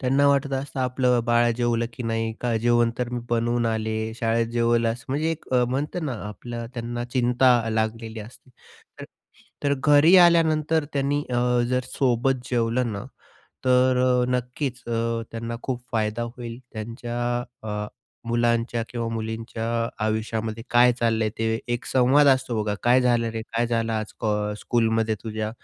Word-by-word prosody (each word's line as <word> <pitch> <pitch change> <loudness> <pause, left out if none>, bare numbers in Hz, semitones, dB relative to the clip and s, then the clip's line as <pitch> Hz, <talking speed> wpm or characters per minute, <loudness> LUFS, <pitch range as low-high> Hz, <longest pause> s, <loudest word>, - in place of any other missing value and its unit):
त्यांना 135 +2 +3
वाटत 140 0 +2
असतं, 135 0 -3
आपलं 125 -1 +2
बाळ 120 0 +3
जेवलं 120 -1 +1
की 125 - -7
नाही 115 -1 -1
का, 120 -2 0
जेवण 120 0 +3
तर 125 -1 -1
मी 120 - -2
बनवून 120 0 +1
आले 110 0 -2
शाळेत 115 0 0
जेवलास 115 0 +1
म्हणजे 150 +5 0
एक 165 -4 -6 0.2
म्हणता 145 +7 -2
ना 140 - -2 0.2
आपलं 115 +3 -7
त्यांना 120 0 -4
चिंता 125 -1 +2
लागलेली 110 0 -2
असते. 120 +4 -13 0.5
तर - - -6 0.6
तर 140 - +2
घरी 150 +5 +6
आल्यानंतर 160 -3 +4
त्यांनी 140 +1 0
अ, 125 0 +2
जर 125 0 +1
सोबत 130 0 +1
जेवलं 120 0 0
ना 100 -1 -5 0.6
तर, 125 0 +3
नक्कीच 125 +1 -2
अ, 115 0 -1
त्यांना 115 +1 -5
खूप 125 -2 -3
फायदा 110 0 0
होईल. 120 -1 -7
त्यांच्या 115 +2 -5 0.5
अ, 105 0 -3 0.4
मुलांच्या 120 0 +1
किंवा 115 -2 -3
मुलींच्या 110 0 -4 0.4
आयुष्यामध्ये 110 +1 -2
काय 120 +1 +6
चाललंय 115 -2 +2
ते 115 - -1 0.3
एक 120 - -5
संवाद 130 +3 +4
असतो 130 -5 +2
बघा, 105 -1 -1
काय 125 +2 +5
झालं 120 -2 +2
रे? 115 0 -4
काय 115 +2 -1
झालं 115 -1 -1
आज 110 -1 -3
क 115 - -2 0.3
स्कूलमध्ये 115 -2 +1
तुझ्या 110 -1 -3
120 Hz, 150 wpm, -24 LUFS, 115-125 Hz, 0.6 s, घरी